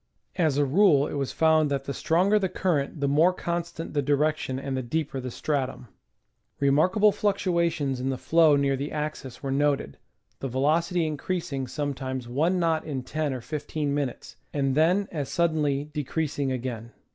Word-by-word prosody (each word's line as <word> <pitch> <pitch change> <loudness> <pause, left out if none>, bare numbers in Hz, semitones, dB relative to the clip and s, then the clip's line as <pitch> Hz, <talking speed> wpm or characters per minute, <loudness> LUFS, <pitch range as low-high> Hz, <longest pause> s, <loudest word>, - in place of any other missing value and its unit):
As 155 -6 +2
a 145 - +3
rule 145 -1 +4
it - - -5
was 140 -2 -2
found 160 -2 +3
that 140 -1 -1
the 140 - -4
stronger 185 +9 +2
the 190 -2 0
current 155 -5 -1
the 140 - +2
more 155 +6 +4
constant 170 -2 -4
the 145 - +1
direction 145 -1 0
and 135 0 -3
the 130 - -1
deeper 140 +2 -2
the 130 0 -5
stratum. 130 -2 -3 0.7
Remarkable 180 +10 +4
fluctua 185 -4 +1
tions 135 -5 -2
in 130 +1 -1
the 135 - -1
flow 155 +4 +4
near 140 -1 +2
the 140 +3 -4
axis 150 -4 -5
were 135 - -2
noted, 140 - 0 0.4
the 135 - -3
velocity 160 +7 +1
increasing 150 -3 -3
sometimes 130 -3 -4
one 155 +9 +1
knot 165 -2 +1
in 140 -5 -4
ten 155 +2 -2
or 130 -2 -4
fifteen 150 +1 -3
minutes, 140 -4 -4
and 135 -2 0
then 175 +7 +3
as 145 -5 -3
sud 170 -1 +1
denly 145 -1 -1
decreasing 145 -1 -2
again. 120 -2 -4
145 Hz, 175 wpm, -26 LUFS, 135-160 Hz, 0.7 s, rule